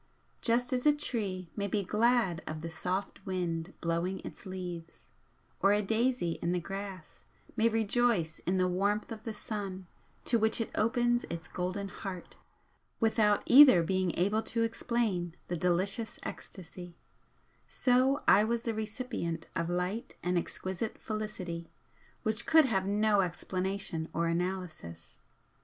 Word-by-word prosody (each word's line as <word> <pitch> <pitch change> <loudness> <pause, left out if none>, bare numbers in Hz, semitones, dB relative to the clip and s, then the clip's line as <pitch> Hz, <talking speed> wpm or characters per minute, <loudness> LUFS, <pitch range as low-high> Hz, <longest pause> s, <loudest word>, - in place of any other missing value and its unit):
Just 245 +2 +1
as 250 +3 +1
a 295 - +6
tree 195 - -2
may 200 -1 -1
be 200 +1 0
glad 215 -3 +2
of 155 0 -4
the 165 0 -5
soft 185 +3 -3
wind 175 -2 -2
blowing 170 +3 -1
its - - -9
leaves, 175 -3 -7 0.5
or 200 - +5
a 210 0 +2
daisy 225 -4 0
in 170 +1 0
the 180 - +1
grass 195 -2 -7 0.3
may 230 +1 +4
rejoice 220 -6 +2
in 185 +1 +2
the 185 0 +3
warmth 200 +5 0
of 220 -1 -6
the 225 - -3
sun 195 -3 -5 0.4
to 235 - +3
which 220 +2 +2
it 225 - -2
opens 240 +2 +2
its 170 0 -6
golden 185 +3 -3
heart 190 -4 -7 0.6
without 220 -2 +3
either 255 - +9
being 185 0 +1
able 205 +5 +2
to 230 0 -1
explain 225 -7 -1
the 175 - -1
delicious 185 +6 0
ecstasy, 175 -1 -8 0.7
so 260 +2 +2
I 205 - +7
was 230 +1 0
the 230 - -1
recipient 215 -7 -4
of 165 -1 -1
light 180 +6 -2
and 180 +1 0
exquisite 190 +4 -3
felicity 190 -6 -5 0.5
which 220 0 0
could 320 -2 +7
have 195 -6 0
no 205 0 +3
explanation 185 -2 -3
or 170 - +1
analysis. 170 - -4
195 Hz, 145 wpm, -31 LUFS, 175-225 Hz, 0.7 s, either